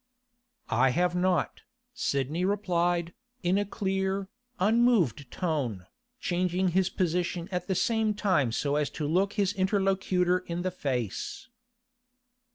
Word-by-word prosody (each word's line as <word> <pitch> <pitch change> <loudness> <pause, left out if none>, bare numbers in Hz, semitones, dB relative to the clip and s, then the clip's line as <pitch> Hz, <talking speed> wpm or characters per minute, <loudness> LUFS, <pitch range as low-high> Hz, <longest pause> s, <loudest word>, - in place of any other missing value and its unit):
'I 125 +4 +4
have 180 0 +2
not,' 180 0 0 0.3
Sidney 145 - -1
replied, 175 -3 0 0.3
in 180 +3 +2
a 205 - 0
clear, 195 -1 -2 0.3
unmoved 195 - +3
tone, 135 - -2 0.3
changing 180 -1 0
his 185 +1 +2
position 175 -1 -1
at 180 -1 -3
the 190 - 0
same 220 +2 +1
time 170 - +2
so 140 +5 0
as 150 -1 0
to 155 - -4
look 190 +6 +1
his 205 -2 +1
interlocutor 190 -2 +1
in 175 -1 -5
the 185 - -1
face. 130 - -3
180 Hz, 125 wpm, -28 LUFS, 165-195 Hz, 0.3 s, I